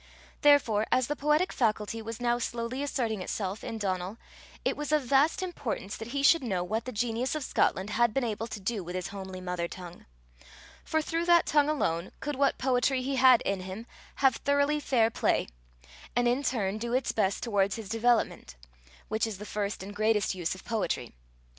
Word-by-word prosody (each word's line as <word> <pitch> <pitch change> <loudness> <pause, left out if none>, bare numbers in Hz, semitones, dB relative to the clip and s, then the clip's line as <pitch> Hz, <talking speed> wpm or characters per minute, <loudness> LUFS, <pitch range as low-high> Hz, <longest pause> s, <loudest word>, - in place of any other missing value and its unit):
Therefore, 240 -8 +4
as 255 - +3
the 295 - -2
poetic 300 +5 +1
faculty 220 -1 0
was 225 +1 -6
now 240 0 +1
slowly 235 +2 -3
asserting 235 -7 -1
itself 195 +2 -3
in 225 - -4
Donal, 190 0 -2 0.5
it - - +1
was 295 0 -4
of 305 -2 +3
vast 280 +8 +3
importance 260 - -4
that 225 - -7
he 275 +3 -2
should 330 +4 +6
know 190 -7 -1
what 220 +5 -2
the 255 - -4
genius 240 +4 -1
of 305 - -2
Scotland 200 -4 +1
had 235 +1 +3
been 270 +3 0
able 225 -1 -2
to 220 -2 -6
do 200 0 -2
with 175 +1 -6
his 185 0 -3
homely 190 -2 -7
mother 180 -1 -3
tongue, 175 -1 -10 0.8
for 315 0 0
through 330 +2 -1
that 345 -1 +5
tongue 295 -1 +3
alone, 170 - 0
could 295 0 -3
what 275 +1 +2
poetry 255 0 +1
he 270 +1 -1
had 255 -2 +7
in 195 -1 -1
him 190 +5 -7 0.3
have 265 -3 +3
thoroughly 285 +1 +2
fair 230 -6 +2
play, - - +1 0.7
and 245 0 +3
in 245 +3 +2
turn 215 -7 -1
do 235 +1 -3
its 260 +1 +1
best 195 -3 0
towards 200 -4 +1
his 225 -3 -7
development 230 - +1 0.5
which 220 +1 0
is 215 -4 -5
the 210 - -8
first 205 -2 -3
and 205 +2 -8
greatest 215 -1 +2
use 180 -1 -2
of 190 - -14
poetry. 225 -3 -2
230 Hz, 195 wpm, -29 LUFS, 200-270 Hz, 0.8 s, had